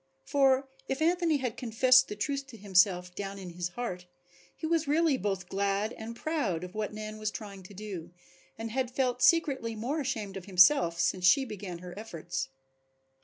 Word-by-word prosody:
For 270 -1 +3 0.2
if 270 - -1
Anthony 335 -1 +2
had 250 -5 -3
confessed 255 +2 +5
the 210 - -5
truth 275 +5 -2
to 245 -4 -11
himself 180 -2 +3
down 200 +1 -5
in 185 -3 -8
his 175 +1 -3
heart 180 -3 -5 0.5
he - - -5
was 325 -1 +1
really 310 0 +3
both 195 -5 -2
glad 200 +3 0
and 225 +1 -7
proud 235 - -1
of 180 0 -8
what 215 -1 -3
Nan 215 0 -7
was 215 0 -1
trying 205 -2 -8
to 185 +2 -13
do 190 -5 -6 0.5
and 225 0 -5
had 255 0 -1
felt 250 -1 -1
secretly 270 -8 +3
more 260 +8 -2
ashamed 220 -8 -3
of 185 - -8
himself 180 -2 +5
since 180 0 +1
she 270 +9 +5
began 200 -6 -6
her 175 - -7
efforts. 170 -9 -5
215 Hz, 180 wpm, -30 LUFS, 190-265 Hz, 0.5 s, confessed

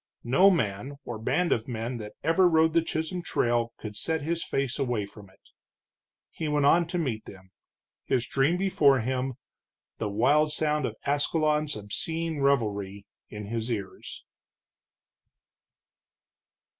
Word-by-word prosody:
No 140 +12 +5
man, 120 - -1
or 115 -3 -5
band 150 +10 +1
of 110 - +1
men, 120 0 -3
that 105 -2 -8
ever 170 +3 +4
rode 160 -1 +4
the 165 - +4
Chisholm 160 +2 -3
Trail 120 -7 0
could 105 -2 -7
set 160 +7 -1
his 165 +2 -1
face 135 0 -2
away 120 -6 0
from 100 -1 -14
it. - - -25 0.8
He 160 - -4
went 150 -1 +2
on 170 +3 +5
to 180 +1 -3
meet 125 -10 -2
them, 95 -1 -13 0.5
his 125 -2 +1
dream 135 +9 +1
before 145 -9 +3
him, 130 +2 -2 0.6
the 105 - -1
wild 145 +9 +3
sound 150 -3 0
of 110 - -6
Ascalon's 150 +1 +1
obscene 160 +10 -3
revelry 100 -8 0 0.2
in 105 -1 -7
his 115 +2 -3
ears. 100 -4 -6
135 Hz, 140 wpm, -27 LUFS, 110-160 Hz, 0.8 s, No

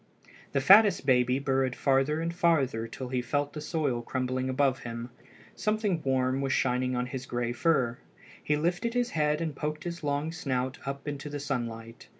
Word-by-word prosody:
The 140 - +2
fattest 200 +3 +6
baby 125 -1 +3
burrowed 135 -2 0
farther 140 +3 +2
and 165 +1 -2
farther 140 -10 +1
till 125 +2 -7
he 125 -1 0
felt 145 +4 -1
the 150 - -6
soil 150 -6 -1
crumbling 130 +1 -2
above 135 0 +2
him. 115 0 -6 0.4
Something 215 -5 0
warm 130 -1 +1
was 135 -1 -1
shining 125 0 +1
on 125 0 0
his 125 0 -6
gray 120 -1 -1
fur. 125 -2 +1 0.4
He 150 - +1
lifted 175 +9 -1
his 245 0 +1
head 150 0 +1
and 160 -3 -2
poked 150 +1 -3
his 170 -1 -5
long 145 +2 -1
snout 130 -6 -2
up 140 +1 -5
into 145 0 -4
the 145 0 -4
sunlight. 115 -5 -5
135 Hz, 175 wpm, -29 LUFS, 125-155 Hz, 0.4 s, fattest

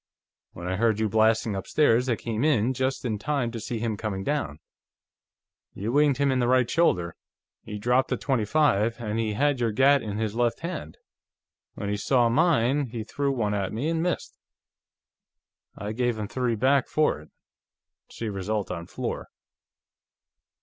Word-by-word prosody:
When 85 +1 -7
I 95 +1 -1
heard 110 0 +2
you 110 - +2
blasting 110 0 +2
upstairs, 125 +4 +2
I 120 - +2
came 115 0 -3
in, 130 -5 +2
just 130 +1 -2
in 110 -4 -1
time 135 -1 -1
to 115 - -5
see 115 +2 -4
him 110 -1 -2
coming 100 -3 -3
down. 140 - -2 1.2
You 105 +4 -3
winged 145 -1 +3
him 140 -1 +2
in 130 - +1
the 120 - +2
right 125 -1 +3
shoulder; 90 - +1 0.5
he'd 105 -1 -7
dropped 125 +2 +2
the - - 0
.25, 115 -3 +1
and 110 -1 -2
he 110 -2 -1
had 145 +3 +1
your 115 -2 +1
gat 135 +5 +4
in 105 -2 -4
his 110 -2 -2
left 120 0 0
hand. 165 - -5 0.8
When 100 - -5
he 105 - -1
saw 120 +2 +2
mine, 145 -1 +2
he 115 -1 -5
threw 140 +5 -1
one 110 -6 -1
at 100 -2 -1
me 130 +9 -1
and 165 -1 0
missed; 180 +1 -3 1.4
I 105 +1 -4
gave 120 0 0
him 105 -1 -3
three 125 0 -1
back 130 +4 +2
for 155 - +1
it. 75 - -17 0.8
See 115 - -6
result 100 0 -2
on 85 -1 -5
floor." - - -4
115 Hz, 170 wpm, -26 LUFS, 105-135 Hz, 1.4 s, gat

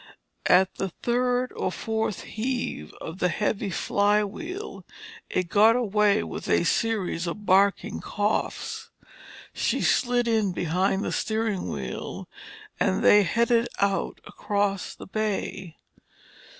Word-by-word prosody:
At 185 +1 +5
the 195 - -2
third 245 +5 0
or - - -1
fourth 220 -3 -2
heave 235 - -3
of 165 +3 -7
the 180 - +2
heavy 205 +3 -1
flywheel 210 - -1 0.5
it 185 -1 -1
got 215 +5 +5
away 210 -3 +2
with - - -6
a - - +3
series 200 -6 0
of 210 +5 -5
barking 195 +1 +3
coughs. 330 - -2 0.6
She - - 0
slid 245 -1 +2
in 220 -5 +1
behind 185 +4 0
the - - -2
steering 220 -3 -1
wheel - - -5 0.5
and - - +1
they 210 - +7
headed 235 +5 +2
out 200 -1 0
across 200 -2 -2
the - - -10
bay. 195 -4 -3
210 Hz, 120 wpm, -26 LUFS, 195-230 Hz, 0.6 s, they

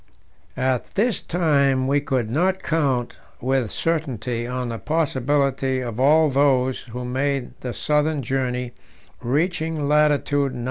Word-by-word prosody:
At 130 -1 0
this 220 0 +1
time 140 -6 +2
we 140 +2 +2
could 130 -5 -1
not 185 +10 0
count 135 -7 0 0.2
with 130 -2 0
certainty 125 -8 -2
on 125 -1 -3
the 115 -1 -4
possibility 140 -3 0
of 120 -2 -5
all 155 +4 +5
those 130 -2 +2
who 125 +1 -6
made 135 +1 -1
the 125 - -4
southern 150 +2 0
journey 125 -1 -2 0.5
reaching 155 +2 -1
latitude 145 -2 +2
90°. - - -6
135 Hz, 130 wpm, -22 LUFS, 125-150 Hz, 0.5 s, all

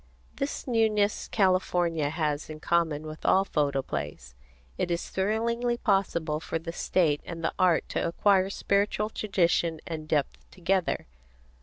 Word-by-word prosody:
This 275 - -3
newness 215 -3 +2
California 175 -6 +1
has 150 -1 -2
in 155 0 -7
common 160 -2 +1
with 155 0 -8
all 190 +1 +4
photoplays. 130 - -2 0.4
It - - -1
is 170 0 -2
thrillingly 235 +4 0
possible 185 -8 0
for 165 - -3
the 165 +1 -6
state 160 -5 +1
and 165 -1 -7
the - - 0
art 180 -3 +3
to - - -1
acquire 190 +2 +3
spiritual 205 +2 0
tradition 170 -6 +1
and 155 -2 -5
depth 150 -3 -1
together. 185 0 0
170 Hz, 135 wpm, -28 LUFS, 155-200 Hz, 0.4 s, all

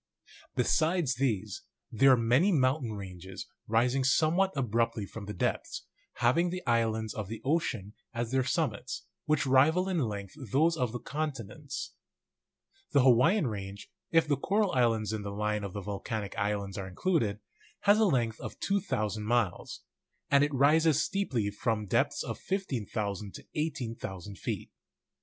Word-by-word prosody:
Besides 155 +3 +2
these, 120 -6 -1 0.3
there 135 +4 +5
are - - +4
many 125 - +3
mountain 130 - +1
ranges 95 -2 -8 0.2
rising 125 +4 +2
somewhat 165 +8 +3
ab 125 -6 -1
ruptly 115 -2 +1
from 110 0 -8
the 105 - -4
depths, - - -2 0.3
having 130 +10 +2
the 180 +1 -5
islands 110 -3 +1
of 110 -3 -4
the 110 +2 -6
oceani 125 - -1 0.2
as 120 -1 -3
their 130 0 +2
summits, 125 - -2 0.2
which 155 -1 +2
rival 150 +8 +4
in 185 -3 0
length 100 -7 -3 0.2
those 160 +4 +3
of 125 -7 -1
the 120 - -3
con 150 +5 -2
tinents. 130 +4 -7 1.0
The 140 -3 +5
Hawaiian 135 - +5
range, 100 -3 -6 0.2
if 165 -2 +3
the 145 -2 +2
coral 200 +6 +1
islands 115 -4 +2
in 110 - -2
the 100 - -5
line 105 +1 -1
of 100 -2 -5
the 100 - -4
volcanic 100 +1 -4
islands 100 -2 -2
are 95 - -5
included, 105 - 0 0.4
has 205 +1 +5
a 220 - +5
length 120 - +1
of - - -7
2,000 110 - -1
miles; 110 -4 -1 0.5
and 140 0 +6
it 145 - +1
rises 150 +3 +4
steeply 135 - 0
from 105 0 -1
depths - - +1
of - - -5
15,000 105 - -3
to - - -10
18,000 115 - -4
feet. - - -4
120 Hz, 155 wpm, -30 LUFS, 105-155 Hz, 1.0 s, and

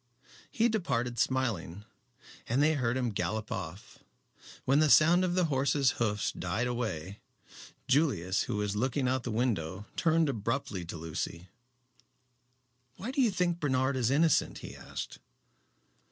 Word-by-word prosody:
He 230 +1 +2
departed 125 - -1
smiling, 110 -7 -1 0.6
and 130 +5 +3
they 155 +1 +4
heard 125 -4 0
him 125 -3 0
gallop 110 +1 -3
off. 90 +2 -6 0.7
When 135 +3 +4
the 155 -1 +4
sound 170 +5 +6
of 180 -1 0
the 180 -1 +3
horse's 140 -2 +2
hoofs 105 -2 0
died 95 +7 -2
away, 100 -7 -3 0.7
Julius, 120 - +2
who - - -1
was 105 -1 -1
looking 130 +4 0
out 130 +1 +2
of - - -6
the 120 - -4
window, 105 -5 -1
turned 165 -1 +3
abruptly 115 -6 -2
to 85 - -6
Lucy. 80 +2 -5 1.5
"Why 225 - -5
do 270 - +1
you 245 - +4
think 180 -3 0
Bernard 130 -2 +1
is 125 -3 +1
innocent?" 140 - +3
he - - -9
asked. - - -7
125 Hz, 145 wpm, -30 LUFS, 105-150 Hz, 1.5 s, sound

